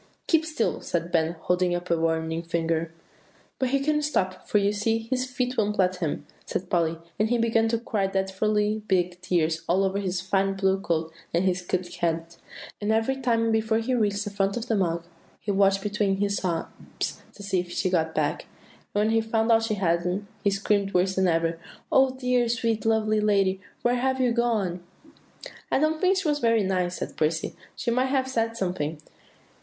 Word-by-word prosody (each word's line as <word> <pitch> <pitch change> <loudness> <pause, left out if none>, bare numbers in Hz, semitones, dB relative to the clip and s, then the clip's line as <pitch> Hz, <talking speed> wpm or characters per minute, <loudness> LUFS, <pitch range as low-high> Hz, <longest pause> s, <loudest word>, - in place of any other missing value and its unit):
"Keep 320 -1 +2
still," 305 -8 -1
said 170 0 -2
Ben, 165 0 +2
holding 180 0 +1
up 175 0 -4
a - - +5
warning 160 0 0
finger. 165 -1 -1 0.7
"But 260 - +1
he 275 +2 +2
couldn't 300 +2 +1
stop, 185 -11 -1
for - - +2
you 200 0 +2
see 225 +2 +1
his 255 0 +1
feet 250 0 -2
wouldn't 210 -1 +1
let 185 -1 +2
him," 165 -5 -3 0.2
said 180 0 -4
Polly; 165 -2 +1 0.2
"and 215 +1 +2
he 240 - +2
began 225 -1 +2
to 230 +1 +1
cry 215 -4 -1
dreadfully 210 +3 0
big 180 -1 +1
tears 165 -3 +1
all 185 +3 +3
over 195 +1 0
his 185 -2 -1
fine 195 +1 0
blue 190 0 +2
coat 165 -4 -1 0.2
and 175 +3 +2
his 180 -1 +1
cocked 180 0 -3
hat; 165 0 -2 0.4
and 205 +1 0
every 225 +4 +2
time 230 -3 +1
before 220 0 +2
he 230 +3 -1
reached 205 -4 +1
the 205 - -5
front 200 +1 0
of 240 +1 -4
the 225 - +1
mug, 170 -3 0 0.3
he 210 - -2
watched 195 0 +3
between 205 -2 0
his 200 0 0
sobs, 170 -3 -4
to 205 - -11
see 195 -2 0
if 175 0 -5
she 185 - 0
had - - -5
got 160 - -15
back; 150 -1 -1 0.5
and 205 - +3
when 215 - +2
he 225 0 +3
found 225 +1 +1
that 225 0 +5
she 225 -1 -1
hadn't, 180 +1 0 0.2
he 200 - +4
screamed 200 0 0
worse 185 +1 +3
than 190 -1 +2
ever, 165 -1 +1 0.3
'Oh, 265 0 +5
dear, 250 -2 +1
sweet, 230 -2 0
lovely 215 -1 +2
lady! 195 -2 +2 0.2
where 245 +1 +3
have 260 +1 0
you 250 -2 +3
gone?'" 220 -7 0 0.9
"I - - +4
don't 310 +2 +1
think 375 +1 +4
she 375 -3 -1
was 295 -1 +1
nice," 190 -6 +2
said - - -5
Percy; 160 +1 -1 0.2
"she 235 - -1
might 250 +2 +2
have 265 -1 +1
said 230 -3 -1
something." 165 -6 -2
200 Hz, 200 wpm, -26 LUFS, 180-230 Hz, 0.9 s, a